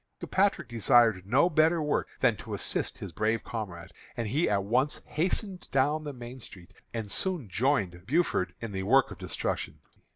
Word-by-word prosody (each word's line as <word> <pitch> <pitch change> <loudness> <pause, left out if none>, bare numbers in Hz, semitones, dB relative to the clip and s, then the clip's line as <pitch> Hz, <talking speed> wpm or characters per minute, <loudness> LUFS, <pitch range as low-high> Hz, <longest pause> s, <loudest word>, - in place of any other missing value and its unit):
Kilpatrick 200 +1 +1
desired 115 -4 +3
no 130 +10 +4
better 160 0 +3
work 150 -1 0
than - - +4
to - - -6
assist - - -3
his 95 - -7
brave 110 +6 0
comrade, 95 -7 -6 0.3
and 115 -2 -1
he 145 +10 +1
at 100 -2 +1
once 125 +8 0
hastened 185 +3 -2
down 145 +3 +1
the 145 - -3
main 125 0 -9
road, 90 -2 -16 0.2
and 110 -3 -4
soon 180 - 0
joined 95 -4 0
Buford 125 - +1
in 115 -2 -5
the 95 -1 -3
work 130 +7 +4
of - - -9
destruction. - - -3
120 Hz, 170 wpm, -29 LUFS, 100-150 Hz, 0.3 s, no